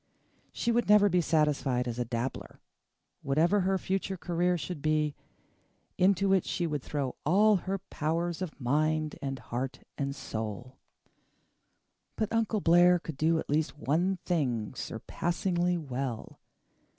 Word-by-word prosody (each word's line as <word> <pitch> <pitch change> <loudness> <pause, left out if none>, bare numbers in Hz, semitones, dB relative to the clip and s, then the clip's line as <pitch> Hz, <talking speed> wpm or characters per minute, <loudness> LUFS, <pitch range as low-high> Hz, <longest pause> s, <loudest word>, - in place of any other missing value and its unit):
She 235 - -1
would 235 -2 +1
never 210 -1 +7
be 180 -1 +3
satisfied 150 -6 +1
as 120 0 -4
a 120 - 0
dabbler; 120 +2 -4 0.6
whatever 165 +9 +2
her 190 0 +1
future 190 +1 -2
career 175 +1 0
should 160 0 -5
be, 155 -1 +1 0.8
into 195 +1 +3
it 190 - +3
she 175 - -2
would 150 -4 -2
throw 140 -2 -3
all 205 +6 +4
her 190 +2 -3
powers 170 -1 -2
of 175 -5 -5
mind 155 +4 0
and 135 -1 -3
heart 130 +2 -5 0.2
and 140 -1 -2
soul. 115 -1 -6 1.4
But 220 0 -2
Uncle 225 -2 +1
Blair 175 +1 +6
could 160 -3 -7
do 160 +4 +2
at - - -3
least 150 +1 0
one 175 +7 +1
thing 130 - -1
surpassingly 175 +8 -1
well. 130 -6 -5
160 Hz, 140 wpm, -29 LUFS, 135-180 Hz, 1.4 s, never